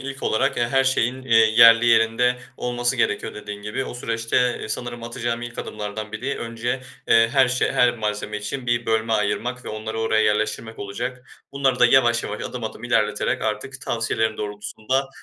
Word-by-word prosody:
ilk 135 0 -7
olarak 110 - +1
ya, 120 -1 +1
her 135 +1 +2
şeyin, 130 0 0
eee, 115 -3 +3
yerli 115 +1 +7
yerinde 115 +2 +3 0.2
olması 120 +1 -1
gerekiyor 120 - -1
dediğin 105 -1 -8
gibi. 105 +5 -3
O - - -7
süreçte 115 -1 -2 0.3
e, - - -6
sanırım 120 +1 -5
atacağım 120 0 -3
ilk 120 0 -8
adımlardan 105 0 -5
biri 135 +3 -3
önce, 115 +2 -3 0.3
eee, 115 0 +5
her 135 -3 +4
şe 125 +1 0
her 120 -1 +3
malzeme 105 0 -3
için 125 +5 -5
bir 120 0 0
bölme 110 0 +1
ayırmak 120 +4 -1
ve - - -6
onları 110 +1 -5
oraya 110 -1 +2
yerleştirmek 110 +1 -1
olacak. 125 +6 -6 0.2
Bunları 135 -2 +1
da 125 - +7
yavaş 120 -2 +4
yavaş, 105 - -5
adım 125 -2 -5
adım 110 +2 -6
ilerleterek 105 -3 0
artık 110 +5 -3
tavsiyelerin 115 -3 -1
doğrultusunda, 110 +6 -3
115 Hz, 175 wpm, -23 LUFS, 110-125 Hz, 0.3 s, yerli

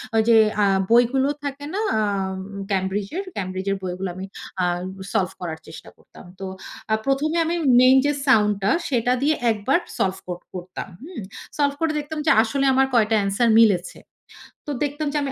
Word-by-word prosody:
ওই 220 - +5
যে 225 - +7 0.3
আ - - +5 0.3
বইগুলো 255 +4 +4
থাকে 285 0 -5
না? 410 - -1 0.2
আ - - +2 0.7
ক্যামব্রিজের? 195 - -2
ক্যামব্রিজের 190 +1 -2
বইগুলো 185 +1 -3
আমি 190 +1 -6 0.4
আ - - +3 0.5
সলভ 185 -2 +1
করার 160 -2 -5
চেষ্টা 160 - -11
করতাম। - - -16
তো 195 - -5 0.5
আ - - +4
১ম 275 +3 +1
এ - - +1
আমি 340 +2 -1 0.3
মেইন 260 +1 +7
যে 290 - +3 0.2
সাউন্ডটা 210 -5 +3 0.2
সেটা 245 -1 +1
দিয়ে 305 +2 +2 0.2
একবার 225 - +1 0.2
সলভ 190 0 0
কর 175 0 -5
করতাম, 180 0 -7 0.2
হুম? 325 - -8 0.4
সলভ 285 -1 +2
করে 325 -1 +2
দেখতাম 300 +1 -5
যে - - +6
আসলে 275 +4 -1
আমার 265 0 +3
কয়টা 220 -1 +3
answer 200 +4 +1
মিলেছে। 190 -6 +3 0.7
তো - - -2
দেখতাম 295 +1 -2
যে - - 0
আমি 275 - -2
230 Hz, 170 wpm, -22 LUFS, 190-280 Hz, 0.7 s, যে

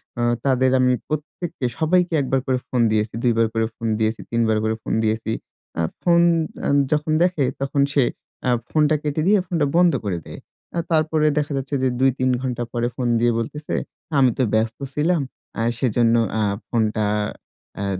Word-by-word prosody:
অ্যা 120 - -2 0.2
তাদের 130 -1 +3
আমি 125 0 +4
প্রত্যেককে, 155 -1 -4
সবাইকে 175 +2 +2
১ - - -2
বার 135 - +2
করে 130 -1 +1
ফোন 125 -2 0
দিয়েছি, 110 0 0
২ 120 -2 +3
বার 115 - +4
করে 115 0 +1
ফোন 115 - -4
দিয়েছি, 110 0 0
৩ 115 - +1
বার 110 -1 +2
করে 110 0 0
ফোন - - -3
দিয়েছি। 110 0 -1 0.5
আ - - +2 0.2
ফোন 170 -1 +4 0.5
আ - - +1 0.2
যখন 150 +1 +1
দেখে, 175 -6 +1 0.2
তখন 140 +1 0
সে 140 - +4 0.4
অ্যা - - 0 0.2
ফোনটা 155 0 +3
কেটে 150 +1 -1
দিয়ে, 205 +1 +5
ফোনটা 165 -4 +1
বন্ধ 175 -3 +5
করে 95 -4 -1
দেয়। - - -9 0.3
অ্যা 170 - -1
তারপরে 155 -1 +2
দেখা 150 0 0
যাচ্ছে 135 +2 -3
যে, 130 - +4
২-৩ 130 -1 +2
ঘন্টা 125 -2 -2
পরে 120 0 0
ফোন 125 - -1
দিয়ে 120 +1 +3
বলতেছে, 150 +6 -5 0.4
আমি 130 -2 +5
তো 130 - +2
ব্যস্ত 110 +1 +1 0.2
ছিলাম, 165 +2 +1 0.3
অ্যা 115 - -1
সেজন্য 120 -1 +2 0.2
অ্যা 110 -1 +1 0.2
ফোনটা 110 -2 0 0.7
অ্যা 100 - -2
130 Hz, 185 wpm, -22 LUFS, 115-150 Hz, 0.7 s, দিয়ে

